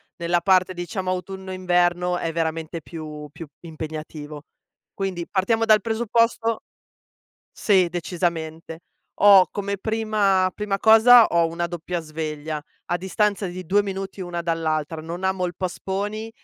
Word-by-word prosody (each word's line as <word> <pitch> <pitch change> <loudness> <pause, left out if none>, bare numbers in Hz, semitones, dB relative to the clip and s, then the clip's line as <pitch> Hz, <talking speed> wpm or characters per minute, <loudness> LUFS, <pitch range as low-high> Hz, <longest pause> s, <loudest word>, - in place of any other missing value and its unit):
nella 170 0 0
parte, 185 0 +3
diciamo, 185 +1 -3
autunno 190 +1 -5
inverno 180 -1 +1
è 165 - -2
veramente 165 0 -3
più 150 -2 -8
più 165 - -9
impegnativo. 155 -2 -8 0.5
Quindi 185 -3 -3
partiamo 225 +4 +1
dal 215 -1 +6
presupposto 230 0 0 0.9
sì, 190 -4 +3
decisamente, 165 -2 -3 0.4
ho 200 -2 +8
come 200 0 -3
prima 210 -3 +1
prima 210 -2 -2
cosa, 225 +3 +8
ho 170 -1 +2
una 170 +1 -3
doppia 175 0 -4
sveglia, 155 -1 -5 0.3
a 175 - 0
distanza 195 +2 0
di 180 0 -7
2 205 +4 +3
minuti 195 0 -6
una 175 -2 -4
dall'altra, 160 -2 -2
non 170 +3 -7
amo 190 -1 0
il 175 - -5
post-poni, 200 +4 -4
180 Hz, 130 wpm, -23 LUFS, 165-195 Hz, 0.9 s, ho